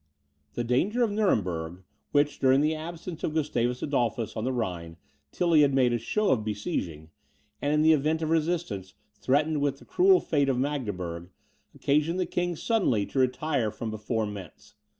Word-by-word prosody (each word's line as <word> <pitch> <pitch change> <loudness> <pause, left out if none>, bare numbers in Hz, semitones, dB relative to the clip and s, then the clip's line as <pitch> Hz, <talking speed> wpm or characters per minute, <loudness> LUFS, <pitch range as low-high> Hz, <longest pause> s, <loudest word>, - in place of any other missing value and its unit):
The 120 - -1
danger 190 - +1
of 225 - +1
Nuremberg, 90 - -1 0.3
which, 145 0 +2
during 135 +1 +4
the 155 +1 +2
absence 165 +1 -7
of 155 - -2
Gustavus 125 -5 0
Adolphus 120 -5 -1
on 110 0 -3
the 130 - 0
Rhine, 90 -9 -4 0.3
Tilly 170 -3 +3
had 140 -2 +3
made 125 -2 +3
a 120 - 0
show 210 - 0
of 115 -5 +1
besieging, 95 - -4 0.5
and, 145 - 0
in 150 0 +3
the 160 0 +6
event 155 +2 +1
of 160 - -1
resistance, 155 - -1 0.2
threatened 150 +3 +1
with 140 -1 0
the - - -17
cruel 375 +1 +4
fate 140 -3 +1
of 130 - +1
Magdeburg, 100 - -3 0.5
occasioned 150 +5 +1
the 185 - +1
king 175 0 -2
suddenly 155 - +1
to 135 - -3
retire 130 -1 +1
from 110 +1 -5
before 110 +1 -2
Mentz. 100 -5 -9
135 Hz, 170 wpm, -27 LUFS, 110-160 Hz, 0.5 s, the